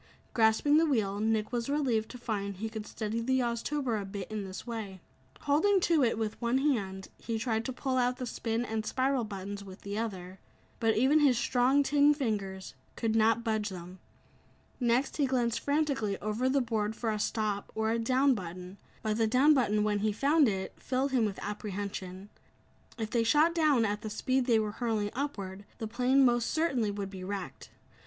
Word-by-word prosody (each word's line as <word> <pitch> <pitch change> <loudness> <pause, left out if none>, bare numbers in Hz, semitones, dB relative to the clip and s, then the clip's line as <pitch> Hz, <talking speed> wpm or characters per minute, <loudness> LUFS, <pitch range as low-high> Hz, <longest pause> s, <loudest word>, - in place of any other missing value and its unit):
Grasping 225 +6 +4
the 325 - +5
wheel, 205 -8 0
Nick 220 0 0
was 240 +1 -2
relieved 255 -7 0
to 250 - -8
find 200 -5 -3
he 220 +3 -3
could 220 -1 -6
steady 220 +1 -3
the 260 +2 +1
Oztober 235 0 -1
a - - -5
bit 195 0 -7
in 215 -2 -3
this 190 -1 -7
way. 220 -5 -6 0.4
Holding 330 +8 +3
to 330 -5 +3
it 230 -2 +1
with 220 0 -3
one 235 +2 +2
hand, 200 -10 -1
he 230 -1 -3
tried 225 -1 -1
to 260 - -2
pull 260 +1 -2
out 250 0 +1
the 255 - -4
"spin" 230 0 -2
and 220 -1 -2
"spiral" 260 +2 0
buttons 200 -1 -6
with 190 -1 -11
the 200 +1 -4
other. 190 -4 -5 0.4
But 225 -1 +2
even 270 +6 +4
his 275 -5 +4
strong 260 +4 +3
tin 290 +1 +4
fingers 200 -8 -3 0.2
could 225 -2 -1
not 225 +1 +3
budge 220 -2 -1
them. 180 0 -9 0.8
Next, 245 +2 +1
he 285 -3 +2
glanced 240 -3 0
frantically 280 -9 0
over 215 +5 -1
the 275 +1 +2
board 220 -3 -1
for 225 -1 -1
a 215 - -2
"stop" 210 -2 -2
or 220 0 0
a 230 - 0
"down" 260 +4 +3
button, 180 -1 -7 0.2
but 215 0 -1
the 225 - +3
"down" 265 +7 +5
button 215 -6 +2
when 210 -1 +1
he 215 +1 +1
found 285 +6 +3
it, 190 -3 -2
filled 265 +2 -1
him 250 -4 +3
with 200 -2 -3
apprehension. 200 -2 -5 0.7
If 220 -2 -4
they 235 -2 +2
shot 300 +8 +4
down 300 -8 +3
at 205 0 -2
the 215 - -5
speed 255 +4 0
they 235 -3 +5
were 215 -1 0
hurling 215 -2 -1
upward, 200 -8 -4
the 225 - -4
plane 255 +4 +3
most 240 -1 +2
certainly 270 -9 +1
would 200 -1 -4
be 190 -2 -8
wrecked. 195 -1 -6
225 Hz, 195 wpm, -30 LUFS, 205-260 Hz, 0.8 s, the